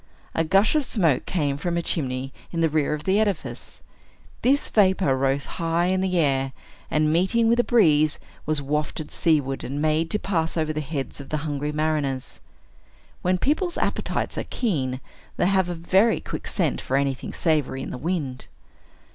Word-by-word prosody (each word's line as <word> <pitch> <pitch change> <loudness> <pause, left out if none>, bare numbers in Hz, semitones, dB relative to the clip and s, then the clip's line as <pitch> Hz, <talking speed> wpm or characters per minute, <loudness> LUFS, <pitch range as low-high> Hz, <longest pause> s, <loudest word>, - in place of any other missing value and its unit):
A 165 - +1
gush 195 +6 +3
of 305 -2 +2
smoke 170 - +1
came 145 -6 0
from 170 +3 -2
a - - +1
chimney 135 -5 -2 0.2
in 165 - -1
the 165 - +3
rear 150 0 +1
of 150 - -8
the 195 +2 +2
edifice. 205 -5 -3 0.6
This 280 +3 +2
vapor 190 -8 +3
rose 135 +1 0 0.2
high 165 +1 +1
in 190 - +1
the 185 -1 0
air, 135 -4 +1 0.4
and, 155 0 +2
meeting 190 +7 +3
with 235 +1 +3
a - - +5
breeze, 155 -12 +4 0.3
was 155 -2 +1
wafted 150 +2 -2
seaward, 145 -5 +1
and 140 +3 -4
made 155 +2 +1
to 210 - +1
pass 170 -5 -1
over 155 -1 0
the 155 - -2
heads 140 -2 -4
of 135 - -12
the 155 0 -2
hungry 145 0 -2
mariners. 150 -4 -2 0.8
When 185 +1 +2
people's 315 - 0
appetites - - -1
are - - -3
keen, 135 - -1 0.4
they - - +2
have 190 -1 +2
a 175 - -3
very 190 +7 +3
quick - - -6
scent - - 0
for 135 - 0
anything 140 -2 -1
savory 150 -5 0
in - - -6
the 125 - -6
wind. 150 -5 -3
155 Hz, 180 wpm, -24 LUFS, 140-185 Hz, 0.8 s, a